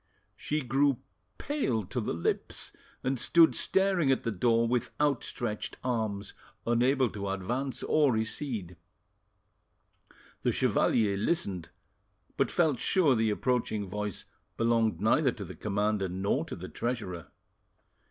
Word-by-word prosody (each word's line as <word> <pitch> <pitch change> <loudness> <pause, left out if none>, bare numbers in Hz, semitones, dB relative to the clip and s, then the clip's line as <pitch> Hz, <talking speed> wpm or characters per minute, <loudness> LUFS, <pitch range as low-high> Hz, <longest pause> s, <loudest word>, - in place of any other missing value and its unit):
She 150 +1 -2
grew 135 +2 +2 0.4
pale 195 - -1
to 120 +7 -3
the 105 - -2
lips, 85 - 0 0.3
and 130 -1 0
stood 160 +8 +6
staring 190 -7 +2
at 130 - +1
the 115 - -1
door 115 +3 +2
with 120 0 0
outstretched 125 -6 -1
arms, 110 -5 -2 0.3
unable 125 +3 +3
to 100 -1 -4
advance 120 +8 -3
or 150 -3 +3
recede. 110 - -3 1.6
The - - +2
chevalier 105 -3 +2
listened, 100 - -1 0.7
but - - +1
felt 155 -8 +2
sure 170 -8 +3
the 110 -2 +2
approaching 110 -2 0
voice 105 0 -4 0.3
belonged 115 -2 +2
neither 130 +6 +3
to 100 - -7
the - - -8
commander 105 -1 0
nor 95 +3 -1
to - - -6
the - - -8
treasurer. 100 - -4
115 Hz, 125 wpm, -29 LUFS, 105-135 Hz, 1.6 s, stood